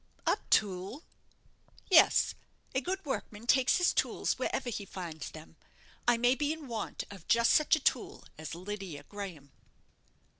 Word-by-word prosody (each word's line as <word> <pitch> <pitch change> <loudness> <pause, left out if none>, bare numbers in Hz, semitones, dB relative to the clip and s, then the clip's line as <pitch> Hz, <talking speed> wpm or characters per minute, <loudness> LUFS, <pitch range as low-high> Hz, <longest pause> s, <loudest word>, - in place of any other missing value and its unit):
"A - - +2
tool?" 200 - +1 0.8
"Yes; 355 -4 +6 0.4
a 260 - +1
good 380 +5 -3
workman 225 -5 -4
takes 255 +2 +4
his 360 -1 +3
tools - - 0
wherever 245 - -1
he 205 - -4
finds 175 -5 -6
them. 160 0 -13 0.5
I 240 -1 +5
may 245 +2 +4
be 290 +3 0
in 315 -3 -6
want 225 -4 -4
of 195 -5 -12
just 235 0 +4
such 305 +1 +5
a - - -2
tool - - -1
as 155 +1 -7
Lydia 185 -4 -6
Graham." 180 -9 -8
215 Hz, 150 wpm, -31 LUFS, 185-265 Hz, 0.8 s, Yes